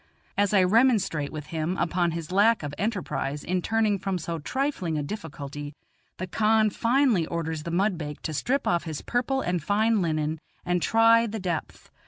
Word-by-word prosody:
As 205 Hz, -1 st, +2 dB
I 195 Hz, -3 st, +5 dB
remonstrate 200 Hz, -, +2 dB
with 150 Hz, -2 st, -6 dB
him 165 Hz, +3 st, -1 dB
upon 175 Hz, +1 st, +1 dB
his 165 Hz, 0 st, -5 dB
lack 210 Hz, +1 st, +4 dB
of 145 Hz, -1 st, -4 dB
enterprise 180 Hz, -8 st, -2 dB
in 180 Hz, +1 st, -1 dB
turning 215 Hz, -1 st, +1 dB
from 195 Hz, 0 st, -2 dB
so 165 Hz, 0 st, -4 dB
trifling 190 Hz, -, -2 dB
a 150 Hz, -, -1 dB
difficulty, 145 Hz, -4 st, -7 dB, 0.4 s
the 185 Hz, -, -3 dB
khan 215 Hz, +3 st, +2 dB
finally 235 Hz, -, +2 dB
orders 160 Hz, -2 st, -3 dB
the 170 Hz, -, -6 dB
mudbake 170 Hz, -5 st, -1 dB
to 160 Hz, -, -3 dB
strip 265 Hz, -, 0 dB
off 175 Hz, 0 st, +1 dB
his 155 Hz, -3 st, -5 dB
purple 255 Hz, +2 st, 0 dB
and 180 Hz, -5 st, -1 dB
fine 215 Hz, +5 st, +2 dB
linen 155 Hz, -2 st, -1 dB, 0.3 s
and 180 Hz, 0 st, +1 dB
try 230 Hz, +2 st, +5 dB
the 220 Hz, 0 st, -4 dB
depth. 175 Hz, -4 st, -4 dB
180 Hz, 175 wpm, -26 LUFS, 160-220 Hz, 0.4 s, I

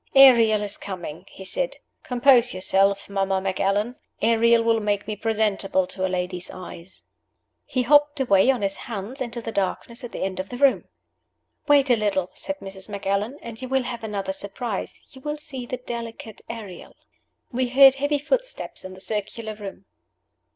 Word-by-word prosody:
"Ariel 230 Hz, -6 st, +7 dB
is 205 Hz, 0 st, -2 dB
coming," 175 Hz, -5 st, -7 dB
he 190 Hz, -, -11 dB
said. -, -, -2 dB, 0.2 s
"Compose 250 Hz, -1 st, +4 dB
yourself, 195 Hz, +1 st, +2 dB
Mamma 195 Hz, -1 st, 0 dB
Macallan; 195 Hz, +5 st, 0 dB, 0.2 s
Ariel 230 Hz, +1 st, +4 dB
with 230 Hz, -1 st, +2 dB
make 205 Hz, -1 st, 0 dB
me 215 Hz, -, -3 dB
presentable 210 Hz, -3 st, 0 dB
to 185 Hz, +1 st, -6 dB
a 190 Hz, -, +1 dB
lady's 180 Hz, 0 st, -3 dB
eyes." 185 Hz, 0 st, -10 dB, 0.6 s
He 255 Hz, -, 0 dB
hopped 290 Hz, +3 st, +4 dB
away 220 Hz, -3 st, +4 dB
on 250 Hz, -6 st, +2 dB
his 195 Hz, 0 st, 0 dB
hands 230 Hz, +3 st, -6 dB
into 240 Hz, -1 st, -4 dB
the 225 Hz, -, -4 dB
darkness 230 Hz, +5 st, -3 dB
at 245 Hz, -, -6 dB
the -, -, -4 dB
end 190 Hz, -1 st, -3 dB
of 190 Hz, -, -4 dB
the 245 Hz, -, -6 dB
room. 275 Hz, 0 st, +3 dB, 0.8 s
"Wait 285 Hz, -3 st, +5 dB
a -, -, +7 dB
little," 200 Hz, -4 st, 0 dB
said 290 Hz, 0 st, -4 dB
Mrs. 195 Hz, +1 st, -8 dB
Macallan, 200 Hz, +5 st, -2 dB
"and 230 Hz, 0 st, -8 dB
you 255 Hz, -, -5 dB
will 265 Hz, -1 st, +2 dB
have 240 Hz, -2 st, -5 dB
another 200 Hz, -3 st, -3 dB
surprise 200 Hz, +2 st, -5 dB
you 265 Hz, -, -13 dB
will 295 Hz, +2 st, -3 dB
see 270 Hz, -5 st, -6 dB
the 255 Hz, -, -3 dB
'delicate 230 Hz, -3 st, -7 dB
Ariel.'" 210 Hz, -6 st, -8 dB, 0.6 s
We 255 Hz, 0 st, 0 dB
heard 270 Hz, +1 st, +8 dB
heavy 285 Hz, +2 st, 0 dB
footsteps -, -, -2 dB
in 185 Hz, 0 st, -8 dB
the 185 Hz, -, -12 dB
circular 215 Hz, +1 st, -4 dB
room. 200 Hz, -2 st, -9 dB
220 Hz, 170 wpm, -24 LUFS, 195-255 Hz, 0.8 s, heard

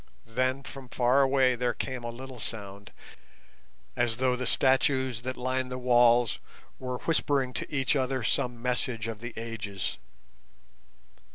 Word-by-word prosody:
Then 130 Hz, +4 st, 0 dB
from 135 Hz, -2 st, -10 dB
far 125 Hz, +3 st, +3 dB
away 135 Hz, -1 st, +4 dB
there 120 Hz, 0 st, 0 dB
came 130 Hz, -2 st, -4 dB
a 120 Hz, -, -3 dB
little 130 Hz, +1 st, -8 dB
sound 100 Hz, -2 st, -5 dB, 1.0 s
as 120 Hz, -2 st, +1 dB
though 130 Hz, 0 st, +2 dB
the 125 Hz, 0 st, -3 dB
statues 130 Hz, -2 st, +2 dB
that 130 Hz, +1 st, -4 dB
lined 130 Hz, +1 st, -1 dB
the 125 Hz, -, -3 dB
walls 120 Hz, -2 st, +4 dB, 0.4 s
were 125 Hz, -1 st, -3 dB
whispering 140 Hz, -5 st, +1 dB
to -, -, -4 dB
each 135 Hz, -1 st, +1 dB
other 130 Hz, -2 st, 0 dB
some 120 Hz, +3 st, 0 dB
message 125 Hz, -2 st, -1 dB
of 110 Hz, -2 st, -5 dB
the 120 Hz, +2 st, -6 dB
ages. 105 Hz, -4 st, -4 dB
125 Hz, 145 wpm, -29 LUFS, 120-130 Hz, 1.0 s, away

